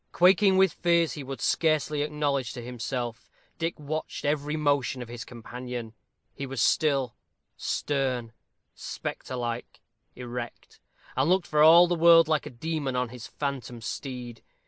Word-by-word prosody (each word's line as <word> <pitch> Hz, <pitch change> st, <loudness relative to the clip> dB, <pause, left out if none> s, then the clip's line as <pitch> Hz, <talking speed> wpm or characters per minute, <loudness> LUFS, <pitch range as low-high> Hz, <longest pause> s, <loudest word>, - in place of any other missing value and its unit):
Quaking 190 Hz, +2 st, +5 dB
with 190 Hz, -4 st, +4 dB
fears 170 Hz, -2 st, +2 dB
he 145 Hz, -, -6 dB
would 135 Hz, 0 st, -6 dB
scarcely 155 Hz, -2 st, +1 dB
acknowledge 145 Hz, -4 st, -1 dB
to 120 Hz, -, -7 dB
himself, 120 Hz, -1 st, -4 dB, 0.3 s
Dick 165 Hz, 0 st, -2 dB
watched 155 Hz, +2 st, -4 dB
every 150 Hz, +1 st, 0 dB
motion 145 Hz, -4 st, +1 dB
of 120 Hz, -, -13 dB
his 120 Hz, -1 st, -6 dB
companion. 120 Hz, -1 st, -7 dB, 0.4 s
He 140 Hz, -1 st, -5 dB
was 135 Hz, -1 st, -5 dB
still, 135 Hz, -1 st, +2 dB, 0.4 s
stern, 130 Hz, -5 st, -1 dB, 0.4 s
spectre 130 Hz, -, -6 dB
like, 120 Hz, -1 st, -4 dB, 0.4 s
erect; 120 Hz, -1 st, -7 dB, 0.4 s
and 135 Hz, +5 st, +2 dB
looked 185 Hz, -1 st, +3 dB
for 150 Hz, 0 st, +1 dB
all 165 Hz, +3 st, +9 dB
the 175 Hz, -, 0 dB
world 165 Hz, -1 st, +7 dB
like 155 Hz, -1 st, +1 dB
a -, -, -5 dB
demon 145 Hz, 0 st, -3 dB
on 125 Hz, -1 st, 0 dB
his 125 Hz, 0 st, -9 dB
phantom 135 Hz, -4 st, -4 dB
steed. 120 Hz, -1 st, -6 dB
140 Hz, 145 wpm, -27 LUFS, 125-155 Hz, 0.4 s, all